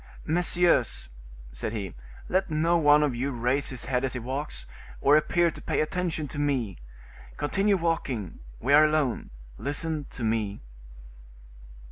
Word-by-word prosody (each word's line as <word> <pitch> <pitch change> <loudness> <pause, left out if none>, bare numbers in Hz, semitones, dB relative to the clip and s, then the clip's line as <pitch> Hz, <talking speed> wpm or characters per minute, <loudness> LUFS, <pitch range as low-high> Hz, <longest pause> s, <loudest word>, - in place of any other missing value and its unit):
"Messieurs," 170 - +2 0.4
said - - -4
he, 100 -5 -4 0.3
"let 190 +1 +1
no 160 +2 +2
one 150 -2 +5
of 145 -4 +1
you 125 +4 -2
raise 125 +2 0
his 130 -2 -4
head 125 0 0
as 135 - -1
he 125 - -3
walks, 130 - -4 0.3
or 145 - +5
appear 170 +2 +3
to - - -11
pay - - -1
attention 160 -1 -1
to 145 - -6
me; 130 - -1 0.6
continue 195 +6 +1
walking, 155 - -2 0.2
we 140 +4 +1
are 150 +1 +8
alone, 150 -5 0 0.3
listen 150 +1 -1
to 125 - -7
me." 110 - -1
145 Hz, 145 wpm, -27 LUFS, 120-160 Hz, 0.6 s, are